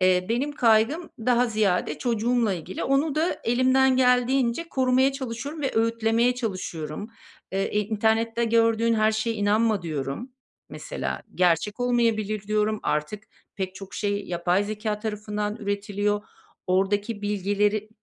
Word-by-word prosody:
Eee, 185 0 +3
benim 255 +6 0
kaygım 245 +5 +2
daha 245 +1 +2
ziyade 205 -8 0
çocuğumla 235 -2 +1
ilgili. 180 +2 -5
Onu 275 +2 +1
da 320 +3 0
elimden 255 +2 +3
geldiğince 250 +3 +2
korumaya 260 0 +2
çalışıyorum 270 +3 -5
ve 270 - 0
öğütlemeye 230 +2 +2
çalışıyorum. 185 - -4 0.4
Eee, 195 +1 0
e, 210 - 0
"İnternette 225 +2 +1
gördüğün 230 0 +3
her 215 0 +3
şeye 220 +1 -1
inanma." 210 -1 +2
diyorum, 155 - -4 0.4
mesela. - - -5
"Gerçek 180 +5 +1
olmayabilir." 225 -4 +1
diyorum. 215 +1 0
Artık 175 +8 -2 0.3
pek 190 -1 -3
çok 195 0 -10
şey 205 -1 -2
yapay 175 +3 +1
zekâ 210 0 -3
tarafından 210 -1 -3
üretiliyor. 205 0 -1 0.5
Oradaki 205 +3 0
bilgileri, 205 +1 0
215 Hz, 125 wpm, -25 LUFS, 205-240 Hz, 0.5 s, Eee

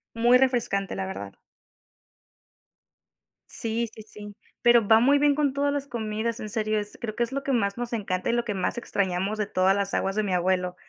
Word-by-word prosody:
Muy 240 +2 +5
refrescante, 240 - +1
la 95 0 -3
verdad. 100 +1 -7 2.1
Sí, 230 +1 -2
sí, 220 - -11
sí, 210 -1 -10 0.3
pero 235 -3 +5
va 220 0 +7
muy 280 +4 +4
bien 290 0 +4
con 290 -3 +1
todas 285 +1 0
las 280 -1 -3
comidas 225 0 -3
en 215 - -6
serio, 215 -1 0
es 210 0 -6
creo 215 -2 -4
que 240 - +1
es 235 - -4
lo 275 0 -3
que 275 - -1
más 200 -5 0
nos 240 0 -4
encanta 190 -4 -2
y - - +2
lo 240 0 0
que 210 - -2
más 185 +2 -2
extrañamos 195 -2 -1
de 210 - -1
todas 190 0 +2
las 200 -1 -2
aguas 195 0 -1
de 215 - +1
mi 195 - -1
abuelo, 180 0 0
215 Hz, 210 wpm, -26 LUFS, 195-240 Hz, 2.1 s, va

